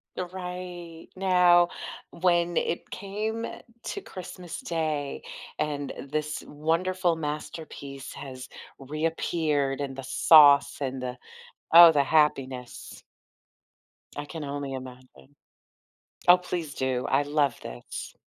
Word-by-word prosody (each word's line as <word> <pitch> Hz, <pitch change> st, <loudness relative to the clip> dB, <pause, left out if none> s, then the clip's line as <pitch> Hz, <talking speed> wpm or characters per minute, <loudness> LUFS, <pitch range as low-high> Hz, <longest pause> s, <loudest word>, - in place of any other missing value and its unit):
The 185 Hz, -, -2 dB
right. 180 Hz, -2 st, -8 dB
Now, 180 Hz, -2 st, +5 dB, 0.4 s
when 175 Hz, -1 st, +1 dB
it 170 Hz, -, -1 dB
came 215 Hz, +3 st, -4 dB, 0.4 s
to 400 Hz, -, -5 dB
Christmas 180 Hz, -, -8 dB
Day, 155 Hz, -4 st, -2 dB, 0.4 s
and 145 Hz, -2 st, -2 dB, 0.2 s
this 150 Hz, 0 st, -2 dB
wonderful 170 Hz, +4 st, 0 dB
masterpiece 150 Hz, -3 st, -6 dB
has 130 Hz, -2 st, -9 dB, 0.3 s
reappeared, 150 Hz, -1 st, -1 dB
and 135 Hz, -2 st, -4 dB
the 135 Hz, -, -7 dB
sauce, 145 Hz, +2 st, +6 dB
and 130 Hz, -1 st, -3 dB
the 125 Hz, 0 st, -4 dB, 0.6 s
oh, 170 Hz, 0 st, +11 dB
the 145 Hz, -3 st, +3 dB
happiness. 135 Hz, -5 st, 0 dB, 1.1 s
I 145 Hz, -, -5 dB
can 160 Hz, +1 st, -7 dB
only 140 Hz, -1 st, -4 dB
imagine. 130 Hz, -, -11 dB, 0.9 s
Oh, 180 Hz, +1 st, +9 dB
please 175 Hz, -4 st, -4 dB
do, 130 Hz, -1 st, -1 dB
I 135 Hz, +2 st, +3 dB
love 145 Hz, -2 st, 0 dB
this. -, -, -8 dB
155 Hz, 110 wpm, -27 LUFS, 140-175 Hz, 1.1 s, oh